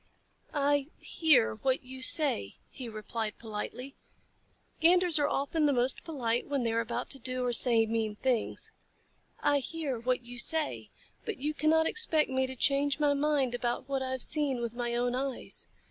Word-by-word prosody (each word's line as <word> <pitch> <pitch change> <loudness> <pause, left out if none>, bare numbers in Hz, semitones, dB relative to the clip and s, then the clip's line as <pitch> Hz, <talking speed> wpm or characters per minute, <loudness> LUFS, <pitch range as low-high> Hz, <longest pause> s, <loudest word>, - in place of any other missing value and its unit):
"I 285 -1 +1
hear 300 - +2
what 260 - -1
you 260 +1 -9
say," 255 - +6 0.2
he 250 -3 -7
replied 215 0 -5
politely 235 +4 -7 0.9
(Ganders 350 0 +4
are 290 - +2
often 295 +2 0
the 285 - +2
most 250 +1 0
polite 245 -7 -2
when 280 -3 -1
they 230 -1 -1
are 230 - +1
about 230 - -4
to 270 - -5
do 255 +1 -3
or 245 - 0
say 230 -2 +3
mean 220 -1 -2
things). 245 0 -2 0.7
"I 285 0 +2
hear 280 -3 -4
what 250 +1 -1
you 240 0 -7
say, 315 +4 +1 0.3
but 445 - -5
you 295 +3 -2
cannot 320 +1 +2
expect 320 -9 0
me 260 0 0
to 260 - -6
change 280 +2 +1
my 295 -1 +3
mind 280 -3 0
about 245 +1 -3
what 275 -1 -2
I 260 - -3
have 260 -1 -1
seen 290 -5 -1
with 235 -1 -4
my 240 0 -3
own 245 0 0
eyes. 265 0 -4
260 Hz, 175 wpm, -30 LUFS, 240-290 Hz, 0.9 s, say